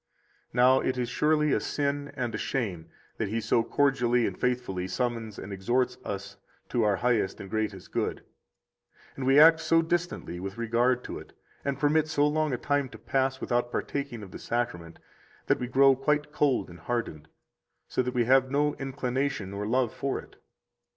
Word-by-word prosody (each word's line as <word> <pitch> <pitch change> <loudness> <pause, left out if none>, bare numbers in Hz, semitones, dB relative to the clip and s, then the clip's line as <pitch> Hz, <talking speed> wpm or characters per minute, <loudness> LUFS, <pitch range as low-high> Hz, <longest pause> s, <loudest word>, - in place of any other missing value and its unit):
67 - - -11
Now 130 +2 +6
it 130 - -1
is 120 -2 -1
surely 150 +2 +2
a - - +2
sin 145 0 -2
and 120 -4 -2
a - - -2
shame 90 -11 -3 0.3
that 110 - -1
He 110 +3 -1
so 115 +1 +2
cordially 125 -3 +2
and - - -2
faithfully 120 -8 -1
summons 115 0 -2
and 100 - -7
exhorts 120 +7 0
us 100 0 -6 0.3
to 120 - +1
our 105 -2 +3
highest 115 -4 0
and 100 - -7
greatest 110 -4 -3
good, - - -2 0.9
and 130 -1 -3
we 135 +2 +6
act 160 +1 +8
so 165 0 +3
distantly 170 - -2
with 95 +3 -6
regard 120 +2 +1
to - - -6
it, - - -14 0.3
and 140 -1 -1
permit 155 +2 +2
so 145 -2 +2
long 155 0 +1
a 125 - 0
time 145 +1 0
to - - -11
pass 130 0 0
[without 120 -1 -1
partaking 140 -6 -3
of 95 - -10
the - - -8
Sacrament] 90 -9 -3 0.5
that - - +2
we 125 - -3
grow 135 +2 +5
quite 150 +2 0
cold 140 -9 +1
and 85 - -12
hardened, 115 -11 -3 0.6
so - - 0
that 125 0 -3
we 120 - +3
have 130 +1 +4
no 145 +2 +1
inclination 135 -5 -2
or 100 +1 -3
love 125 0 +1
for 140 - -2
it. - - -11
125 Hz, 185 wpm, -28 LUFS, 110-140 Hz, 0.9 s, act